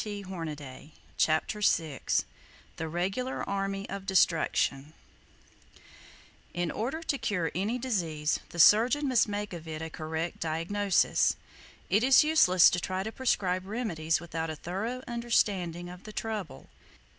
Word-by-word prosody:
[Page 205 -2 -6
53] 155 -6 -7 0.2
CHAPTER 160 +7 +1
VI 160 - +1 0.8
THE 160 - -3
REGULAR 195 +10 -2
ARMY 195 0 -2
OF 195 0 -7
DESTRUCTION 155 -5 +1 1.6
In 175 -1 -1
order 270 +9 -3
to 280 -4 -1
cure 175 -6 -1
any 205 +7 -1
disease, 170 -12 -1
the - - -10
surgeon 240 - +5
must 255 -4 +3
make 205 -1 -4
of 165 -1 -8
it 155 0 -5
a 160 - -6
correct 160 +2 -4
diagnosis. 170 +5 +1 0.5
It 210 +4 +2
is 265 +3 +7
useless 245 - +6
to 180 - 0
try 185 +1 -3
to 220 - -4
prescribe 190 -7 0
remedies 175 -8 -1
without 165 -1 -4
a 155 - -4
thorough 215 - -4
understanding 200 -8 0
of 180 0 -11
the 215 - -9
trouble. 220 -3 -5
190 Hz, 135 wpm, -29 LUFS, 165-220 Hz, 1.6 s, is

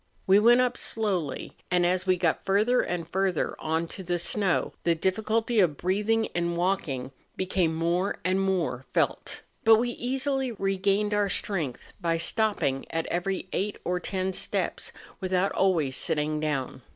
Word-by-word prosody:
We 195 +2 +6
went 240 +3 +6
up 250 -1 0
slowly; 185 -11 -1
and, 180 -1 +2
as 185 +1 0
we 185 -1 +3
got 170 -2 0
further 210 +6 +3
and 175 -2 -3
further 190 -1 0
on 160 +1 -1
to 195 - -8
the 175 -1 -1
snow, 185 +1 0
the 170 -1 +2
difficulty 220 +6 0
of 165 -7 +3
breathing 210 +5 +1
in 170 0 -1
walking 165 -8 -1 0.2
became 180 -3 0
more 170 +4 0
and 185 +1 +2
more 165 -10 -1
felt; - - 0 0.2
but 225 0 +8
we 240 +2 0
easily 265 +1 -1
regained 195 +1 0
our 205 -1 +2
strength 165 - -3
by 165 -2 +1
stopping 170 -7 +1
at 165 0 -2
every 185 +2 -2
eight 205 +1 -1
or 180 0 0
ten 190 +1 -2
steps - - -2 0.3
without 185 0 0
always 165 -9 +1
sitting 155 -2 0
down. 140 -4 -2
185 Hz, 155 wpm, -27 LUFS, 165-205 Hz, 0.3 s, but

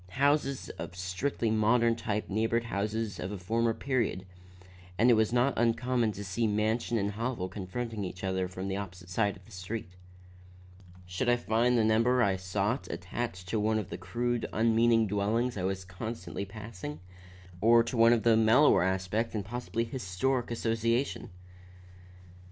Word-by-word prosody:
Houses 140 0 +1
of - - -6
strictly 95 +6 -2
modern 115 +2 +3
type 105 -2 -3
neighbored 115 +3 0
those 105 0 -2
of 90 - -4
a 105 - -4
former 115 +5 0
period, 120 -8 -1 0.7
and 120 +4 +5
it - - +7
was 110 -1 +2
not 125 +2 +3
uncommon 120 0 +1
to 100 - -7
see 100 +4 -1
mansion 110 +3 0
and 100 -1 0
hovel 115 -2 -3
confronting 105 +3 -5
each 90 0 -6
other 95 -1 0
from 95 +1 -6
the 95 - -2
opposite 90 -2 -7
side 100 +1 0
of 95 - -19
the 115 - -18
street. 90 +1 -6 1.1
Should 90 +8 -1
I 120 - +5
find 120 +1 +2
the 115 - +3
number 115 +3 +3
I 100 -4 +2
sought 100 +6 -2
attached 90 0 -5
to 110 - 0
one 110 +1 +1
of 100 -3 -4
the - - -4
crude, 120 0 -2
unmeaning 115 0 +3
dwellings 105 +5 0
I 100 - -3
was 95 0 -2
constantly 95 0 -5
passing, 100 -7 -8 0.6
or 115 +2 +6
to 115 - -4
one 115 0 +6
of 120 -1 +2
mellower 115 +4 +5
aspect 95 +5 -1
and 105 -3 -2
possibly 120 +1 -3
historic 120 +2 -2
association? 115 +2 -1
110 Hz, 160 wpm, -30 LUFS, 95-120 Hz, 1.1 s, it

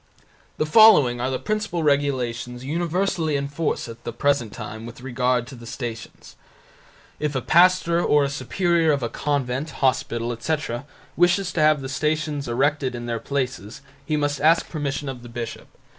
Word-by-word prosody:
The - - +1
following 150 - +6
are 125 - 0
the 130 - -1
principal 210 -4 -2
regulations 130 -4 -1
universally 170 +1 0
in 140 0 -1
force 150 0 -2
at 115 +1 -10
the - - -4
present 125 -1 0
time 110 +1 -7
with 120 +1 -11
regard 125 -1 0
to 130 - -11
the 120 -1 -12
Stations: 115 -3 -7 0.8
If 150 -2 -2
a - - +2
pastor 175 0 +4
or 145 -1 +4
a 140 - 0
superior 165 +2 +1
of 140 -3 -1
a 120 - -1
convent, 140 +2 -2
hospital, 120 -4 0
etc., 125 +1 -3 0.3
wishes 175 +2 +2
to 165 - 0
have 155 -1 +4
the 135 - -5
Stations 150 +1 -1
erected 135 +1 0
in 120 0 -6
their 115 -1 -2
places 130 -7 -4 0.2
he 150 +2 -1
must 145 -1 -1
ask 165 +2 +4
permission 145 -2 -3
of 130 -2 -5
the 120 - -11
bishop. 115 -1 -6
140 Hz, 170 wpm, -23 LUFS, 120-155 Hz, 0.8 s, following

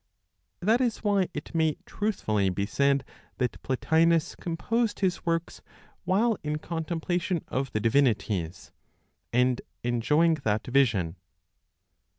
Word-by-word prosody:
That 220 +7 +3
is 240 -3 -1
why 200 -3 +2
it 145 - -7
may 160 -2 +1
truthfully 110 - 0
be 100 +2 -1
said 140 +5 +1 0.3
that 125 -3 -2
Plotinos 160 +4 +2
composed 215 +7 -1
his 185 -2 0
works 165 0 -1 0.4
while 210 +4 +2
in 150 0 -2
contemplation 170 +2 -2
of 135 -1 -2
the 110 - 0
divinities, 105 - 0 0.6
and 125 +1 +2 0.2
enjoying 150 +8 +3
that 105 -2 0
vision. 110 -10 +2
150 Hz, 115 wpm, -27 LUFS, 120-175 Hz, 0.6 s, That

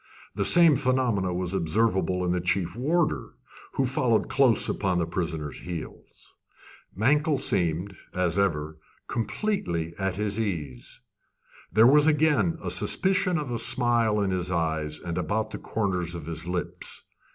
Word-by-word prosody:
The - - -1
same 170 -4 +7
phenomenon 125 -9 0
was 90 0 -3
observable 95 0 +1
in 90 - 0
the 90 0 0
chief 90 0 -1
warder, 155 +7 0 0.4
who 135 - +1
followed 125 -3 +1
close 130 -5 +3
upon 95 -3 0
the 85 - +1
prisoner's 80 -4 -4
heels. 85 -3 -9 0.6
Mankell 145 - +2
seemed, 90 - 0 0.2
as 90 0 +1
ever, 80 -5 -1 0.3
completely 110 - -2
at 95 -2 -1
his 105 +1 -1
ease. 75 - -4 0.7
There 110 +6 +5
was 145 +4 +6
again 160 +2 +2
a - - -3
suspicion 185 -2 +1
of 145 -5 -4
a 120 - -2
smile 115 -4 +1
in 100 -1 0
his 90 -1 -1
eyes 80 -3 -1
and 85 0 -4
about 110 +6 -2
the - - -6
corners 90 -5 -2
of 85 -4 -7
his 85 +1 -5
lips. 90 0 -4
95 Hz, 145 wpm, -26 LUFS, 85-125 Hz, 0.7 s, same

